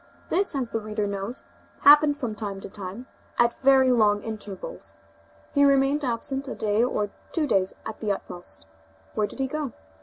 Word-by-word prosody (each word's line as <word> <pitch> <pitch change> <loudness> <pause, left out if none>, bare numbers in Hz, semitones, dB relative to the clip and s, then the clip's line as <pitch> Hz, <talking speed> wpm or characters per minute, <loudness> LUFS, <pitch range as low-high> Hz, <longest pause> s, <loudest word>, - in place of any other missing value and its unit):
This, 370 -3 +2
as 255 -4 -2
the 225 - 0
reader 215 -1 -2
knows, 200 +5 -4 0.4
happened 295 0 +7
from 245 -6 -3
time 205 -2 -5
to - - -7
time, 200 +5 -7 0.3
at 240 0 +2
very 265 -1 +6
long 210 -4 +3
intervals. 205 - -6 0.6
He 285 - +4
remained 280 +1 +4
absent 270 +3 -2
a - - -4
day 215 +1 +1
or 210 -5 0 0.2
two 320 -3 +1
days 195 -8 +1
at 220 - -6
the 215 -2 0
utmost. 175 - -5 0.5
Where 210 -1 +1
did - - -12
he 270 - 0
go? 285 -1 -3
230 Hz, 175 wpm, -26 LUFS, 205-275 Hz, 0.6 s, happened